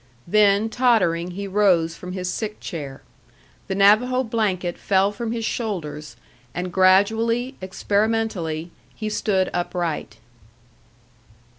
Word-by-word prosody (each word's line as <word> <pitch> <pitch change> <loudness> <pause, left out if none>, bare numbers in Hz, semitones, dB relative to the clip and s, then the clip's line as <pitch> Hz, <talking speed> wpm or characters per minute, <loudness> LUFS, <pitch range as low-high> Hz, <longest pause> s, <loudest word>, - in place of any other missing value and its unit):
Then, 205 +2 +4
tottering, 210 -9 +2
he 200 - -3
rose 185 -5 +2
from 180 0 -8
his 185 -1 -4
sick 210 +3 -4
chair. 140 -7 -7 0.6
The 190 - -2
Navajo 220 +6 +4
blanket 200 -7 -1
fell 195 0 +2
from 225 +2 -4
his 230 -1 -3
shoulders, 150 - -4 0.4
and 180 0 -4
gradually, 225 +7 +3
experimentally, 190 -4 -1 0.2
he 215 -1 -4
stood 190 -3 0
upright. 175 -10 -3
195 Hz, 110 wpm, -22 LUFS, 175-220 Hz, 0.6 s, Then